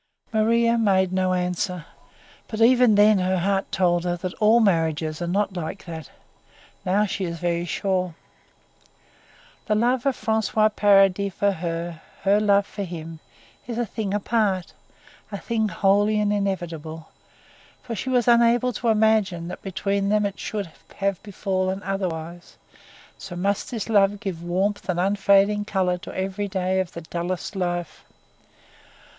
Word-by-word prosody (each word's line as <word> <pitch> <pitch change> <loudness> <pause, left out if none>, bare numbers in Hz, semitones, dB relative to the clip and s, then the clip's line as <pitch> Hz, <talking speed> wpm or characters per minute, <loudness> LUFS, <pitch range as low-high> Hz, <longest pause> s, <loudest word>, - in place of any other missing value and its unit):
Maria 230 +2 +3
made 190 -4 +2
no 185 0 +1
answer, 180 -1 -2 0.6
but 220 - -6
even 240 -1 +5
then 205 0 +5
her 185 0 +1
heart 195 +2 0
told 175 -2 +2
her 175 -1 -1
that 180 +1 -5
all 220 +2 +6
marriages 160 -6 +1
are 175 - -2
not 195 +2 0
like 175 +2 -5
that; 160 -4 -8 0.7
now 200 +3 +2
she 195 -1 -3
is 170 -2 -3
very 175 0 -1
sure. 185 -1 -1 1.5
The 215 - +2
love 245 +4 +1
of 270 - 0
François 220 -1 +1
Paradis 195 -1 +4
for 200 0 +2
her, 170 -2 -4 0.2
her 200 +1 +4
love 200 -1 +3
for 205 - -7
him, 165 -3 -6 0.5
is 235 -2 -4
a 240 - 0
thing 210 -1 -4
apart 205 -3 0 0.6
a 200 - -4
thing 220 +1 -1
holy 205 +4 +2
and 210 0 +1
inevitable 165 -5 -4 0.7
for 240 - -5
she 225 +5 -4
was 250 -2 +2
unable 240 +1 +4
to 235 - -3
imagine 210 -6 +2
that 185 - -8
between 200 0 -1
them 210 0 +2
it 200 -1 -4
should 205 -4 -4 0.3
have 195 -2 -1
befallen 190 -2 -2
otherwise; 175 -3 -5 0.6
so 190 -3 -8
must 200 +3 -1
this 230 -5 -4
love 205 -2 +3
give 185 -5 -5
warmth 190 +4 -1
and 175 -1 0
unfading 200 +2 +3
colour 185 -3 0
to 200 - -9
every 195 +2 -2
day 190 -1 -1
of 185 -1 -3
the 170 - -7
dullest 175 +4 -4
life. 175 -3 -3
195 Hz, 150 wpm, -24 LUFS, 180-210 Hz, 1.5 s, all